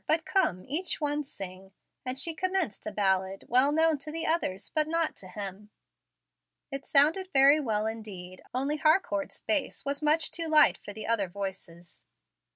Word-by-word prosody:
But 320 +1 +1
come, 185 - 0
each 335 +3 0
one 295 0 -1
sing"; 190 -5 -9 0.3
and 255 +1 -3
she 330 +4 +1
commenced 370 - -2
a - - -3
ballad, 190 -1 0
well 255 +4 +4
known 320 -1 +3
to 305 +2 -7
the 325 +1 -2
others, 205 - -1
but 305 -1 +1
not 330 0 0
to 185 - -11
him. 200 +2 -7 1.0
It 275 0 -6
sounded 315 +7 +4
very 280 +2 +6
well 215 -6 0
indeed, 200 -5 -7
only 275 +4 -1
Harcourt's 310 - +1
bass 305 -4 -1
was 280 +1 -2
much 310 +1 +3
too 330 -1 -2
light 305 -2 +6
for - - -9
the 215 +1 -8
other 220 -4 +1
voices. 175 -3 -8
270 Hz, 165 wpm, -28 LUFS, 200-310 Hz, 1.0 s, very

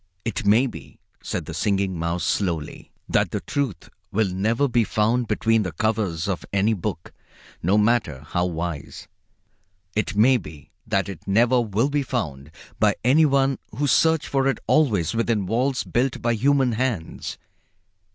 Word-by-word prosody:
"It 100 -3 -2
may 110 +6 +5
be," 80 - -9 0.2
said - - -4
the - - -7
Singing 100 -2 0
Mouse 85 +1 -2
slowly, 85 -6 -2 0.2
"that - - +2
the - - -3
Truth 130 - -3 0.2
will 105 0 +1
never 110 +9 +1
be 120 -2 +2
found 110 +3 +1
between 115 +1 +2
the 90 -5 -3
covers 100 -3 -1
of 95 -3 -2
any 100 +3 +2
book, 95 - -5 0.5
no 95 +5 +2
matter 105 - +1
how 90 0 0
wise. 85 -3 -5 0.9
It 105 -1 -1
may 125 +5 +5
be 75 - -11 0.2
that 95 0 0
it 95 -4 -9
never 120 +5 +4
will 115 +5 0
be 145 0 +1
found 75 - -4 0.3
by - - +3
any 135 +7 +5
who 140 0 0
search 160 +3 +3
for 135 -1 +1
it 135 - +1
always 110 - +2
within 115 -3 0
walls 125 +6 0
built 125 +2 -1
by 120 0 +1
human 135 +2 +2
hands. 115 -8 -3
110 Hz, 155 wpm, -23 LUFS, 95-125 Hz, 0.9 s, may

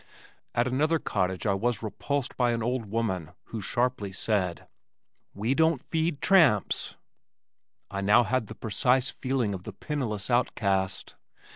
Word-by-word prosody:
At 120 - +3
another 150 +6 +2
cottage 95 - -1
I 100 - +3
was 115 +3 -1
repulsed 135 +5 -2
by 120 -2 +2
an 115 -1 -2
old 125 0 -1
woman 95 -7 -2 0.2
who 110 - -4
sharply 120 -2 -1
said, 95 -3 -1 0.7
"We 110 +6 0
don't 160 -1 +3
feed 160 +1 -1
tramps." 160 - +4 1.0
I 100 0 -3
now 105 +5 +5
had 120 -1 0
the 110 - -8
precise 125 +4 +1
feeling 130 -6 -1
of 95 - -5
the - - -8
penniless 125 -8 -3
outcast. 100 -6 0
115 Hz, 140 wpm, -28 LUFS, 100-130 Hz, 1.0 s, now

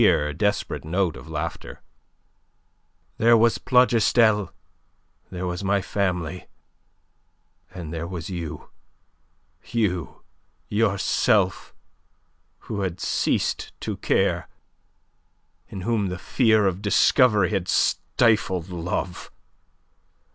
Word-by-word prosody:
It - - +6
was - - +7
a - - +4
queer, 75 0 -2
desperate 105 +6 -1
note 85 +1 -1
of - - -11
laughter. 80 +1 -6 1.4
"There 115 +1 +6
was 115 +1 +3
Plougastel; 115 -5 +3 0.8
there 90 0 -5
was 90 +2 -4
my 100 +1 +2
family. 90 -3 -2 1.2
And 85 -3 -7
there 85 0 -4
was 85 -3 -6
you... 85 -5 -6 0.9
you, 90 - -2 0.5
yourself, 105 -3 +1 0.9
who 100 -2 -5
had 90 -2 -3
ceased - - -1
to - - -3
care, - - 0 1.2
in 95 - -8
whom 105 0 0
the 90 0 -4
fear 110 +1 +2
of 95 0 -1
discovery 105 -1 +3
had 95 -4 -1
stifled 95 -7 +1
love. 90 0 -4
95 Hz, 105 wpm, -24 LUFS, 85-110 Hz, 1.4 s, was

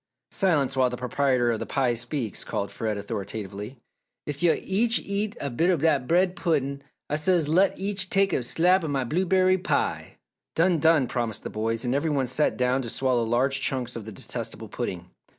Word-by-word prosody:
"Silence 145 -9 +1
while 130 -1 +3
the 125 - -5
proprietor 125 -1 +1
of 115 - -2
the - - -4
pie 130 -3 +1
speaks!" 120 - -3
called 100 - -3
Fred, 110 -2 -3
authoritatively. 100 +3 -6 0.5
"Ef 145 0 -5
yo' 175 -2 +4
each 225 +5 +1
eats 205 +2 -3
a 140 - -3
bit 165 +9 +1
o' 180 - +3
dat 145 -4 +1
bread 180 +2 +2
puddin' 140 -6 -1 0.3
Ah 150 - -1
says, 160 0 +2
let 185 +5 +3
each 195 -1 0
take 195 0 +3
a - - +1
slab 175 +9 +2
o' - - -2
my 140 -3 0
blueberry 185 +6 +2
pie!" 185 - -2 0.4
"Done! 170 0 +3
Done!" 160 -3 +4
promised 120 -3 -3
the - - -6
boys, 115 +2 -2
and 125 - 0
every 145 +4 0
one 140 -3 +1
sat 130 +5 +1
down 125 +1 +1
to 120 - -5
swallow 130 0 +1
large 130 +4 +1
chunks 130 -3 -2
of 115 -3 -6
the 110 - -7
detestable 95 - -6
pudding. 90 0 -5
140 Hz, 195 wpm, -26 LUFS, 120-175 Hz, 0.5 s, yo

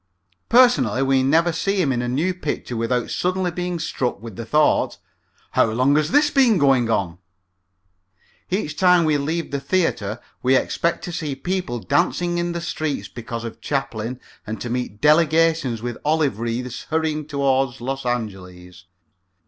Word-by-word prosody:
Personally 140 - +4
we 135 -1 +3
never 160 +6 +3
see 195 +4 -1
him 150 -7 +2
in 120 -2 0
a 120 - -2
new 155 +10 0
picture 150 -7 -4
without 115 +1 -1
suddenly 180 0 0
being 180 0 -3
struck 130 -8 -2
with 115 -2 -9
the 115 +2 -7
thought, 150 +6 +2 0.5
"How - - +4
long 130 +6 +2
has 150 0 +2
this 290 +2 +3
been 255 -7 +4
going 135 -6 +3
on?" 90 -6 -1 1.3
Each 180 -6 -2
time 180 -1 +4
we 150 -2 +2
leave 160 +4 -2
the 140 - -1
theater 135 - -1 0.2
we 130 +1 +3
expect 170 +5 0
to 175 - -5
see 160 -5 -3
people 180 -3 -3
dancing 175 - 0
in 175 0 -1
the 170 - -4
streets 155 -4 -3
because 115 -1 -6
of 115 -1 -8
Chaplin 125 -3 -3 0.3
and 110 0 -4
to 120 +3 -5
meet 125 -4 -4
delegations 155 -5 +3
with 120 -1 -4
olive 150 -7 +1
wreaths 120 +1 -4
hurrying 155 -2 -1
toward 135 -3 0
Los 135 +3 -4
Angeles. 90 -7 -5
140 Hz, 160 wpm, -22 LUFS, 120-170 Hz, 1.3 s, Personally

